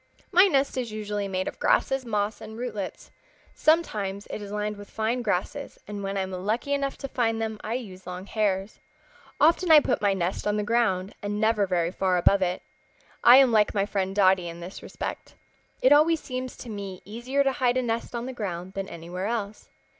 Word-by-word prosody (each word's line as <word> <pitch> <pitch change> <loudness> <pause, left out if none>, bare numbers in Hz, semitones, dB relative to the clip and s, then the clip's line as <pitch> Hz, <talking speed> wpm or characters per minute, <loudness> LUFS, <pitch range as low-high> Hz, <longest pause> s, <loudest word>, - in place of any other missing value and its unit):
"My 365 +3 +7
nest 275 -6 +1
is 240 -3 -4
usually 210 -1 -3
made 185 -1 -2
of - - -6
grasses, 270 -1 +2
moss 210 -1 -1
and 220 0 -9
rootlets. 215 -6 -5 0.4
Sometimes 210 - +1
it - - -5
is 205 -1 -7
lined 210 0 -2
with 205 -1 -11
fine 225 +3 -1
grasses, 225 +6 -2
and 205 0 -5
when 195 0 -3
I - - +1
am 190 0 -4
lucky 215 +10 -1
enough 275 -1 -1
to 275 - -5
find 225 -4 0
them 220 -1 -3
I 220 +2 -2
use 190 -7 -7
long 180 +1 -6
hairs. 200 -1 -1 0.6
Often 335 +3 +4
I 315 -1 +10
put - - -1
my 200 -2 +2
nest 185 +2 -2
on 210 0 +1
the 210 - 0
ground, 205 -4 +1
and 205 0 -3
never 220 -2 +2
very 175 -2 0
far 185 -1 +1
above 195 +3 +4
it. 180 -1 -1 0.6
I 245 +2 +9
am 265 -3 +6
like 215 -1 +3
my 200 -1 +2
friend 195 -2 -2
Dotty 190 -3 +4
in 170 0 -7
this 175 +3 -8
respect. - - -6 0.5
It 260 - +6
always 315 +2 +5
seems 255 -2 -5
to 240 - -9
me 200 -3 -6
easier 240 +7 -1
to 270 - +2
hide 255 -1 +1
a 255 - +1
nest 230 0 -2
on 235 0 -3
the 260 - -5
ground 185 -5 -5
than 195 0 -4
anywhere 175 +3 -5
else. 215 -2 -4
210 Hz, 205 wpm, -26 LUFS, 195-245 Hz, 0.6 s, I